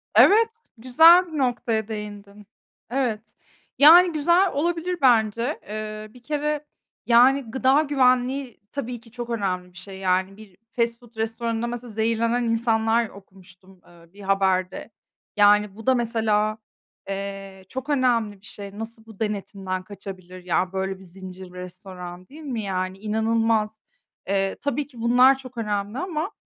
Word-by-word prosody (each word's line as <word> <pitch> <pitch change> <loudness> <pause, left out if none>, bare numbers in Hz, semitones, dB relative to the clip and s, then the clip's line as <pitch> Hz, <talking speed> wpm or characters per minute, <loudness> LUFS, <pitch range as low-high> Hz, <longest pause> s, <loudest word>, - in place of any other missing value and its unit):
Evet, 450 +3 +6 0.3
güzel 325 +10 +6
bir - - -3
noktaya 240 -5 0
değindin. 210 -1 -8 0.4
Evet, 230 -5 -2 0.4
yani, 340 +5 +8
güzel 345 +5 +3
olabilir 345 +4 -1
bence. 235 +1 +2
Eee, 215 0 -6
bir 250 - -17
kere, 300 +2 -2 0.4
yani, 250 +1 +4
gıda 265 +3 +3
güvenliği 260 -2 +1
tabii 250 -4 -5
ki 230 -1 -19
çok 240 0 -7
önemli 185 -5 -2
bir 175 - -16
şey. 190 +1 -8
Yani, 190 +1 0
bir 210 -4 -15
fast 235 -1 -1
food 240 -1 -20
restoranında 225 +1 -2
mesela 240 -1 -6
zehirlenen 230 +2 0
insanlar 230 -1 +1
okumuştum, 190 -1 -17
eee, 170 0 -20
bir 205 - -14
haberde. 190 0 0 0.5
Yani, 205 -1 +4
bu 225 +2 -12
da 260 - +5
mesela, 220 -3 +1 0.5
eee, 195 -1 -6
çok 260 +2 -6
önemli 235 -8 +1
bir - - -18
şey. 200 0 -8
Nasıl 225 0 -7
bu 220 -2 -15
denetimden 195 -3 -3
kaçabilir? 185 -2 -10
Ya, 180 +1 0
böyle, 190 0 -2
bir - - -14
zincir 185 0 -10
restoran 180 0 -9
değil 310 +3 -13
mi? 255 -7 -4
Yani, 185 -1 -3
inanılmaz. 220 0 0 0.5
Eee, 195 0 0
tabii 285 0 -2
ki 245 -5 -12
bunlar 250 +3 +5
çok 255 -2 -12
önemli 210 +1 -2
ama 345 +2 -3
220 Hz, 145 wpm, -24 LUFS, 195-250 Hz, 0.5 s, yani